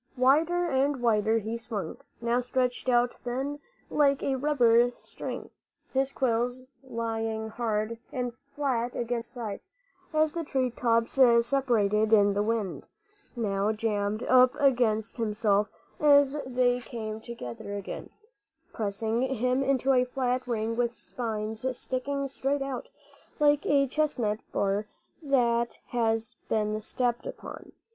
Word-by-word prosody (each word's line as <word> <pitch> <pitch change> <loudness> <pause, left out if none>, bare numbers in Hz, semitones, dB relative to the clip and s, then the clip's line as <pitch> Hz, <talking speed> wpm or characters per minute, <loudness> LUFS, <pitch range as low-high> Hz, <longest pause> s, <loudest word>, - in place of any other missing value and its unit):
Wider 315 +8 +3
and 275 -1 +1
wilder 220 -2 +2
he 225 +1 -3
swung, 215 -8 -5 0.2
now 235 +1 +1
stretched 250 0 -1
out 240 0 +3
thin, 270 +4 -4 0.3
like 280 -2 +3
a 270 - +1
rubber 245 -4 +4
string, - - -7 0.4
his 270 0 +1
quills 250 0 -1
lying 225 -3 -3
hard 225 0 -2
and 245 -2 -2 0.2
flat 250 -4 -1
against 235 -1 -2
his - - -11
sides 230 - -6 0.4
as 310 -1 +2
the 335 +1 -3
tree 260 -4 0
tops 230 +1 +1 0.3
separated 225 -5 +2
in 205 -2 +5
the 205 - +1
wind; 215 -3 -2 0.5
now 205 -3 0
jammed 215 -1 -1
up 255 0 +5
against 240 -6 +2
himself 210 -2 +1 0.3
as 285 -1 +5
they 250 -1 +2
came 220 -2 -6
together 200 - -7
again, 200 -1 -6 0.6
pressing 220 +2 -1
him 255 0 +1
into 270 0 +2
a 250 -1 +4
flat 255 0 -1
ring 225 -1 -1
with 240 0 0
spines 225 +1 -3
sticking 275 +2 -2
straight 275 +1 -1
out, 270 -2 -5 0.5
like 295 -1 +3
a 280 -1 +4
chestnut 255 -7 0
bur 200 +2 0 0.3
that 235 -5 +1
has 225 0 0
been 215 0 0
stepped 240 +2 -1
upon. - - -9
240 Hz, 130 wpm, -28 LUFS, 220-265 Hz, 0.6 s, in